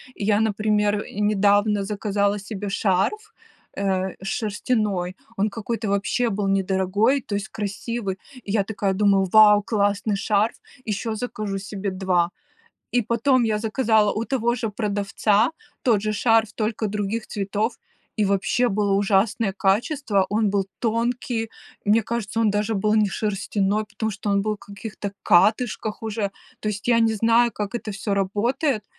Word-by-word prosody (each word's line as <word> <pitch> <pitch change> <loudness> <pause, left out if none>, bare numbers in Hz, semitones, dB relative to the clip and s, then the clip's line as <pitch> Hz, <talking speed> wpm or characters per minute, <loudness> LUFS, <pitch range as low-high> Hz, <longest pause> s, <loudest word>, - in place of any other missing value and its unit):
Я, 205 0 +1
например, 210 -1 +1
недавно 205 0 +2
заказала 205 0 0
себе 200 0 -5
шарф, 200 - 0 0.4
э, 190 -1 -1
шерстяной, 205 -3 -1 0.2
он 210 +2 +1
какой-то 225 +1 -4
вообще 200 +5 +1
был 205 -1 -1
недорогой, 195 +6 +2
то 205 - -4
есть 205 +2 -3
красивый. 205 0 -4 0.3
Я 205 0 0
такая 200 -1 -1
думала: 195 -1 +3
"Вау, 210 -1 +7
классный 205 -1 0
шарф! 210 +2 +1 0.3
Еще 220 +1 -2
закажу 210 -3 -4
себе 200 0 -4
2". 185 -2 +1 0.6
И 245 - +2
потом 240 +4 +2
я 215 -2 +1
заказала 220 -1 +2
у 220 +2 -2
того 240 -3 +1
же 225 -2 -2
продавца 205 +1 +1 0.3
тот 225 -5 +3
же 215 0 -1
шарф, 225 0 +2
только 220 0 -1
других 210 +2 -3
цветов, 205 +3 -2 0.4
и 215 - +2
вообще 200 +5 +1
было 205 -1 0
ужасное 200 +1 +2
качество. 205 - +1
Он 210 0 +2
был 195 -1 0
тонкий, 230 0 -1 0.4
мне 220 +2 +4
кажется, 225 0 -3
он 220 -2 +3
даже 210 +2 0
был 210 +2 +1
не 215 -2 +3
шерстяной, 205 +1 -1
потому 220 +1 -3
что 205 +1 -5
он 200 0 +2
был 215 +1 -1
в - - -37
каких-то 205 0 -7
катышках 215 +4 +2
уже. 215 -2 -2 0.3
То 215 - -2
есть 205 +1 -4
я 235 -1 +5
не 225 -1 +3
знаю, 230 +2 +3
как 210 +2 -4
это 220 -2 -4
всё 200 +1 -3
работает 210 +5 0
210 Hz, 150 wpm, -23 LUFS, 200-225 Hz, 0.6 s, Вау